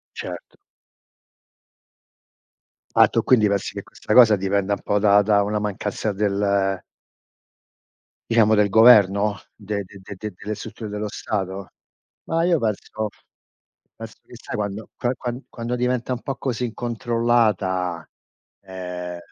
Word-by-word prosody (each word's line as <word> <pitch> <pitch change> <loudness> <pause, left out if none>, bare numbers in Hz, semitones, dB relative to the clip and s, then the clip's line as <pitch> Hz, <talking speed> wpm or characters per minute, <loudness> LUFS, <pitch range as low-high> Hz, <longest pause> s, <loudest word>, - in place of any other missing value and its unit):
Certo. - - -8 2.4
Ah - - +7
tu - - 0
quindi 115 -5 +4
pensi 100 -1 -1
che - - -6
questa - - -4
cosa 115 -3 +8
dipenda 100 +1 0
un - - -4
po' 105 - 0
da 100 0 +5
da 100 0 +3
una 105 +1 -1
mancanza 105 +1 -3
del 100 -1 0 1.5
diciamo 110 -2 +4
del 105 -1 +4
governo? 105 -2 +5 0.2
De 100 -1 -4
de 100 +2 -14
de 100 - -9
de 105 0 -6
delle 105 +4 -5
strutture 105 +1 -8
dello 105 +1 -4
Stato? 95 -2 -4 0.6
Ma 165 +1 +1
io 175 -1 +3
penso 110 -2 -3 0.9
penso - - -10
che, - - -14
sai, - - -7
quando 105 +1 -4
qua 120 - -1
qua 120 - -4 0.2
quando 120 +1 -4
diventa 125 0 -1
un 125 - -3
po' 135 - -4
così 125 -2 -3
incontrollata, 115 -6 0 0.6
ehm, 90 -2 -6
105 Hz, 135 wpm, -22 LUFS, 100-115 Hz, 2.4 s, cosa